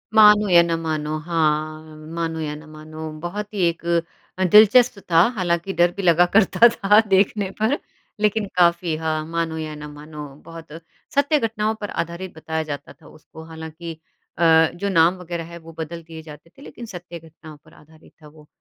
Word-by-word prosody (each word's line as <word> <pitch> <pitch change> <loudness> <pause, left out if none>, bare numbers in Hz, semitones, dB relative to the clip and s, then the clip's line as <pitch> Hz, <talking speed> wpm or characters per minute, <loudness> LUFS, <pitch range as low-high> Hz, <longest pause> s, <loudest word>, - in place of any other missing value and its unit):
मानो 210 -1 +7
या 175 -1 +7
ना 170 -1 -1
मानो 155 -1 -2
हाँ 155 -1 -1 0.2
मानो 165 -1 -3
या 150 -2 -3
ना 155 +1 -12
मानो, 155 +1 -9
बहुत 205 +5 -5
ही 205 - -4
एक 170 0 -4 0.5
अ, 190 - 0
दिलचस्प 215 +4 +6
था 165 - +6 0.2
हालाँकि 175 0 -1
डर 175 -1 +3
भी - - -2
लगा 175 -1 +4
करता 220 +2 +6
था 210 -2 +3
देखने 195 0 +2
पर 225 +7 +1 0.4
लेकिन 210 0 +1
काफ़ी 170 -2 +2
हाँ, 155 -1 -2
मानो 165 0 -3
या 155 -1 -5
ना 150 0 -8
मानो 150 0 -10 0.2
बहुत 165 0 -11 0.5
सत्य 285 +2 +3
घटनाओं 220 -2 -1
पर 205 - -4
आधारित 170 +2 -5
बताया 160 0 -4
जाता 145 -2 -7
था - - -20
उसको, 160 +1 -14
हालाँकि 160 +1 -8 0.4
अ, 160 -1 +5
जो 200 +3 -3
नाम 170 -1 +4
वग़ैरह 170 -1 -5
है, 170 - -8
वो 165 0 -13
बदल 165 +1 -6
दिए 160 0 -10
जाते 155 +1 -13
थे - - -15
लेकिन 240 -4 -10
सत्य 175 -5 -9
घटनाओं 160 -1 -14
पर - - -20
आधारित 155 +1 -20
था 150 - -14
वो। 150 0 -18
165 Hz, 185 wpm, -22 LUFS, 155-190 Hz, 0.5 s, मानो